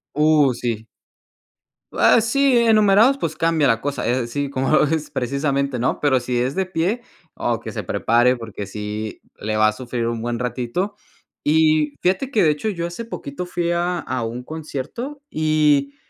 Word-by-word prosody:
Uh, 150 -3 +4
sí. 115 -2 -3 1.1
Ah, 230 - +5
sí, 270 +3 +2
enumerados, 225 +2 +5
pues 160 - -3
cambia 165 -3 +2
la 115 -1 +2
cosa, 145 0 -2
eh, 125 -1 0
sí, 140 +3 -3
como 130 0 -1
lo 155 - +5
ves, 155 0 -1
precisamente 140 0 -1
¿no? 125 - 0
Pero 140 -3 +3
si 125 0 -2
es 125 +3 0
de 190 0 -1
pie, 185 +7 -1 0.3
oh, - - -1
que - - -7
se - - -4
prepare 120 +2 +2
porque 110 -4 -7
sí 105 +1 -5 0.2
le 110 +1 -2
va 110 0 +5
a - - -1
sufrir 120 +1 -4
un 115 -1 -2
buen 120 0 -2
ratito 125 - -2 0.5
y 155 -1 +3
fíjate 190 +9 0
que 220 -9 +2
de 155 - +5
hecho, 150 +9 -2
yo 170 -5 -3
hace 175 +7 -6
poquito 180 -5 -6
fui 175 -1 -1
a 175 +1 0
a 130 -7 -3
un 120 +2 -5
concierto 160 - -6
y 150 -3 +2
145 Hz, 180 wpm, -21 LUFS, 125-175 Hz, 1.1 s, Ah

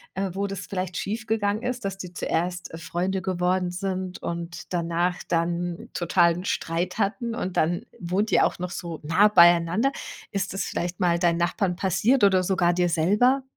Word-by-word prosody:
äh, 190 -1 -2
wo 200 +1 -1
das 195 -1 -5
vielleicht 185 -2 -3
schief 220 +2 -3
gegangen 215 0 0
ist, 250 -3 -3
dass 195 -1 -3
die 180 -2 -7
zuerst, 175 0 -2
äh, - - -5
Freunde 185 +3 -2
geworden 180 -1 0
sind 185 0 -4
und 170 +1 -6
danach 175 +1 0
dann 170 +1 -1
totalen 175 0 +2
Streit 175 +1 -2
hatten 225 +3 -1
und 185 -6 -4
dann 170 +2 +1
wohnt 185 +5 -1
ihr - - +5
auch - - -2
noch 180 0 -4
so 170 -3 -6
nah 190 +7 +4
beieinander? 175 +7 +5 0.4
Ist 195 -2 -2
das 195 - -2
vielleicht 175 +1 -3
mal 175 -2 +2
deinen 170 -1 +2
Nachbarn 175 +1 0
passiert 205 +7 +2
oder 190 -2 +4
sogar 175 -2 +2
dir 175 0 +1
selber? 210 +12 +3
180 Hz, 175 wpm, -25 LUFS, 175-195 Hz, 0.4 s, ihr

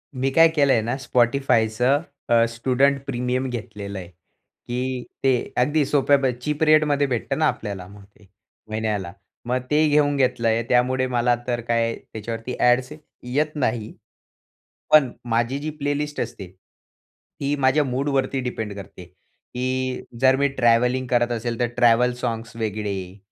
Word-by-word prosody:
मी 130 +1 0
काय 165 +3 +7
केलंय 140 -6 +4
ना 120 +4 -2
Spotifyचं 125 0 +2 0.3
अ, 115 -1 +5
स्टुडंट 130 +4 +1
प्रीमियम 125 0 -1
घेतलेलंय, 100 -6 -6
की 125 +7 -7 0.2
ते 135 - +4 0.3
अगदी 145 +4 +2
सोप्या 140 0 +3
प - - +3 0.2
चीप 150 +3 -1
रेटमध्ये 150 -2 +4
भेटतं 120 -4 -2
ना - - +4
आपल्याला 95 -3 -4
मग 100 0 -14
ते, 100 0 -24 0.4
महिन्याला, 105 -4 -2 0.3
मग 125 +1 0
ते 155 +1 +3
घेऊन 145 -1 +3
घेतलंय 120 -3 +1
त्यामुळे 130 +1 +2
मला 120 -1 +2
तर 120 -1 -1
काय 115 -1 +1
त्याच्यावरती 115 +3 -6
ॲड्स 125 +2 +3 0.3
येत 150 +5 -1
नाही. 115 -6 -2 1.0
पण 150 -5 +6 0.2
माझी 115 +4 0
जी 155 +2 -4
प्लेलिस्ट 145 0 -2
असते 115 -4 -5 1.0
ही 145 +1 0
माझ्या 135 +3 +3
मूडवरती 135 0 -1
डिपेंड 110 -4 -4
करते, 95 -2 -10
की 130 +8 -5 0.2
जर 130 0 +5
मी 140 +1 +2
ट्रॅव्हलिंग 125 +2 +2
करत 120 0 +1
असेल 115 0 -3
तर 120 - +2
ट्रॅव्हल 120 0 +4
साँग्स 115 -1 -4
वेगळे 100 -4 -4
125 Hz, 140 wpm, -23 LUFS, 115-135 Hz, 1.0 s, काय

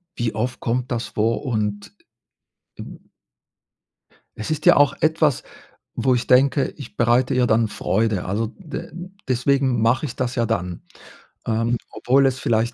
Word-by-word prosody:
wie 120 -2 -2
oft 120 +3 -2
kommt 125 +2 -2
das 120 -1 -2
vor? 115 +5 -1
Und, 105 -4 -2 1.0
hm - - -14 1.3
Es 110 - -5
ist 155 0 -3
ja - - +7
auch 145 -1 +4
etwas, 155 -3 +2 0.5
wo 130 -1 +2
ich 120 0 -2
denke, 135 +2 +4
ich 140 -5 -10
bereite 120 +2 +2
ihr 125 -1 +2
dann 110 0 +3
Freude. 110 -2 -1
Also, 105 +5 -1
d 160 -6 -7 0.4
deswegen 130 -1 +1
mache 120 +5 +2
ich 135 - -6
das 125 -1 -2
ja 120 -2 +1
dann, 90 -6 -3 0.6
ähm, 115 +2 0
obwohl 135 +2 +2
es 130 -1 0
vielleicht 115 +1 0
120 Hz, 150 wpm, -22 LUFS, 110-130 Hz, 1.3 s, ja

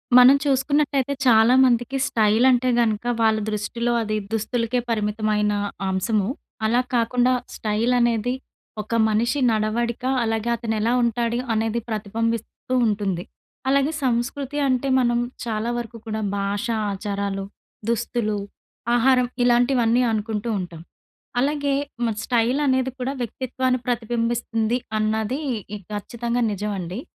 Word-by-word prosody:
మనం 250 +2 +9
చూసుకున్నట్టయితే 280 0 +1
చాలామందికి 245 +2 +4
స్టైల్ 220 +2 +3
అంటే 255 0 +3
గనక, 220 -2 0 0.2
వాళ్ళ 220 -1 +4
దృష్టిలో 235 +3 -1
అది 215 -1 -1 0.2
దుస్తులకే 230 +2 0
పరిమితమైన 210 -1 0 0.3
అంశము. 190 +2 0 0.4
అలా 235 +3 +3
కాకుండా 245 +1 +2 0.2
స్టైలనేది 235 +2 +1 0.5
ఒక 225 +2 -4
మనిషి 235 +6 +1
నడవడిక, 225 +3 -1 0.2
అలాగే 225 0 -1
అతనెలా 225 0 -1
ఉంటాడు, 235 0 0
అనేది 225 +1 0
ప్రతిబంబిస్తూ 225 +3 -3
ఉంటుంది. 200 -5 -1 0.5
అలాగే 275 +2 +3
సంస్కృతి 260 +3 -1
అంటే 255 +1 +1
మనం 240 -1 +2 0.3
చాలా 225 0 -2
వరకు 235 0 -6
కూడా 220 -1 -3 0.2
భాషా, 200 +3 -1 0.2
ఆచారాలు, 200 -1 -3 0.4
దుస్తులు, 235 -2 -1 0.6
ఆహారం 250 +1 +4 0.2
ఇలాంటివన్నీ 245 0 +3
అనుకుంటూ 215 +1 -2
ఉంటాం. 175 -3 -7 0.6
అలాగే 285 0 +1 0.3
మరి 220 -2 -2
స్టైలనేది 260 +2 +1
కూడా 255 +2 -2
వ్యక్తిత్వాన్ని 255 +1 -2
ప్రతిబింబిస్తుంది, 235 0 0 0.2
అన్నది 220 +5 0 0.3
ఇ - - -6
ఖచ్చితంగా 235 +4 -2
నిజమండి. 200 0 -4
230 Hz, 105 wpm, -23 LUFS, 215-250 Hz, 0.6 s, మనం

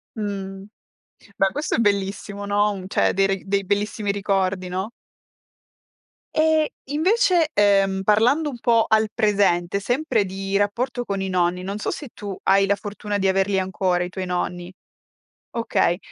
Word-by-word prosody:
Mh. 195 -3 -5 0.7
Beh 195 - +3
questo 295 +1 -2
è - - -5
bellissimo, 200 -1 -1
no, 205 +1 +2
un 190 -2 -7
cioè - - +2
dei 195 0 +2
re 195 -1 -2
dei 200 +1 0
bellissimi 205 +1 -1
ricordi, 195 -2 -1
no? 190 +4 -3 1.5
Eh 315 0 +3 0.2
invece, 350 - +3
ehm, 195 -2 +3
parlando 245 +10 +3
un 245 - -8
po' 230 -1 +3
al 220 0 +3
presente, 200 -4 +2
sempre 245 0 +1
di 195 +1 -4
rapporto 245 +5 -1
con 200 -1 -2
i 190 - -2
nonni, 180 0 0
non 200 +2 -4
so - - -2
se 290 - -7
tu 200 -2 -7
hai 195 0 +4
la 200 +1 +2
fortuna 205 0 -4
di 195 - +1
averli 195 +1 +2
ancora 185 -1 0
i 180 - -4
tuoi 185 0 -5
nonni. 180 0 -3 0.8
Okay. 230 -6 +1
200 Hz, 155 wpm, -22 LUFS, 190-220 Hz, 1.5 s, hai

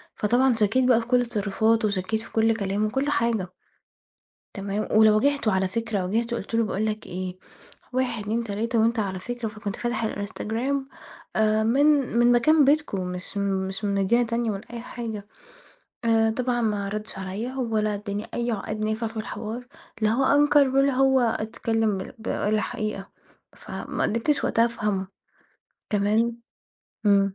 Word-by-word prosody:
فطبعًا 245 +4 +3
شكيت 225 +4 +2
بقى 235 -2 +5
في 230 - -9
كل 245 -1 +3
تصرفاته 220 +1 +1
وشكيت 205 +2 -1
في - - -10
كل 225 0 +3
كلامه 200 0 -1
وكل 270 +6 -1
حاجة 230 -9 +1 1.1
تمام، 200 +1 -3
ولو 215 0 +6
واجهته 280 -3 +2
على 190 0 +1
فكرة 215 -2 -2
واجهته 230 +5 -1
قلت 225 +1 -6
له 230 - +3
باقول 215 +1 -1
لك 215 0 -3
إيه 185 0 -5 0.5
1 245 -4 -1
2 225 +3 -1
3 225 +3 -1
وأنت 230 +1 +2
على 190 -3 -1
فكرة 240 +3 -4
فكنت 210 -2 -5
فاتح 240 -2 -1
الInstagram 225 +6 -2 0.6
آآ 220 0 +3
من 270 +6 +3 0.3
من 240 0 +5
مكان 295 +5 +5
بيتكم 285 -8 +2
مش 180 +2 -6
مش 195 0 -2
من 200 -1 0
مدينة 200 +5 +3
تانية 230 0 -1
والّا 200 +3 -7
أي 235 - -5
حاجة 225 -4 -6 0.8
آآ، 225 -1 +3
طبعًا 245 +1 -1
ما 205 -3 0
ردش 210 -1 -5
عليَّ 200 +7 -4
ولا 220 -5 0
أداني 205 0 -4
أي 240 0 -1
عقاد 215 0 -3
نافع 220 +1 -1
في 225 0 -8
الحوار، 225 +2 -5 0.3
لا 215 0 +3
هو 260 +4 +2
أنكر 290 0 +5
ولا 275 +1 +3
هو 265 0 +4
اتكلم 225 -2 0 0.2
بال 220 - -3
قال 215 +1 +2
حقيقة 215 -5 -4 0.5
فما - - -5
قدرتش 235 +7 +1
وقتها 230 - +3
أفهمه 210 -5 -2 0.8
تمام؟ 220 +3 +1 0.7
إمم. 195 -1 +4
220 Hz, 160 wpm, -25 LUFS, 205-240 Hz, 1.1 s, ولو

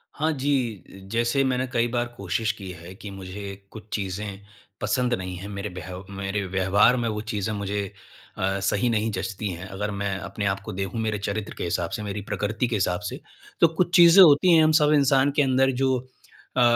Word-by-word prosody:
हाँ 155 +2 +1
जी, 130 - -1 0.3
जैसे 120 +4 +2
मैंने 130 -1 0
कई 115 +1 +2
बार 120 0 -1
कोशिश 100 +4 -1
की 100 -4 -9
है 85 +3 -11
कि 105 0 -9
मुझे 95 +1 -8 0.3
कुछ 110 - -10
चीज़ें 100 0 -4 0.4
पसंद 125 -1 +1
नहीं 95 -4 -3
है, 95 - -7
मेरे 100 0 -5
व्यह 90 0 -8
मेरे 100 +1 -2
व्यवहार 95 +5 +3
में 120 -1 -1
वो 105 -1 -3
चीज़े 110 -1 -3
मुझे 100 0 -2 0.5
अ, 95 +1 0
सही 100 +5 +1
नहीं 110 -1 +1
जँचती 95 +2 -3
हैं। 90 +2 -7
अगर 105 +2 -4
मैं 100 -1 -2
अपने 100 +1 -4
आपको 100 +2 -2
देखूँ 95 +4 -3
मेरे 110 -1 -1
चरित्र 100 +1 -3
के - - -4
हिसाब 85 -1 -1
से, 105 - -4
मेरी 100 0 -4
प्रकृति 105 +4 -2
के 115 - -1
हिसाब 90 -3 0
से - - -7 0.4
तो 170 - +8
कुछ 175 +2 0
चीज़ें 175 +1 +9
होती 170 +2 +6
हैं 160 - +6
हम 155 - +4
सब 150 - +4
इंसान 140 -1 +4
के - - +4
अंदर 135 0 +3
जो 130 -1 +3 0.6
अ, - - +4
105 Hz, 200 wpm, -25 LUFS, 95-125 Hz, 0.6 s, चीज़ें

